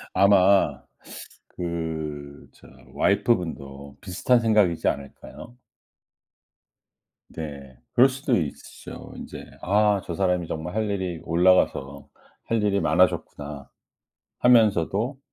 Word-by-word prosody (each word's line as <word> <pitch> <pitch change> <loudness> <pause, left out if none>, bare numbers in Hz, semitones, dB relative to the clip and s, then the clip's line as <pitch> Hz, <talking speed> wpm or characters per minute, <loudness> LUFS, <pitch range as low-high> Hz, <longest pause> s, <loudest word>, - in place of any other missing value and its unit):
아마 95 -6 +4 0.7
그 80 -4 -5
저 - - -18 0.3
와이프 120 - +2
분도 70 -6 -8
비슷한 100 +6 +1
생각이지 105 -7 +2
않을까요? 70 - -6 1.7
네. 70 -5 -9 0.2
그럴 130 +3 +6
수도 135 -1 -1
있죠. 75 -5 -7
인제 - - -9 0.2
'아 105 +1 +2
저 85 - -5
사람이 90 -2 0
정말 80 +4 -5
할 110 -1 -1
일이 95 -4 -3
올라가서 80 -5 +1 0.4
할 115 -2 0
일이 100 -1 +1
많아졌구나.' 75 -3 0 0.7
하면서도 115 - +3
90 Hz, 215 characters per minute, -24 LUFS, 75-105 Hz, 1.7 s, 그럴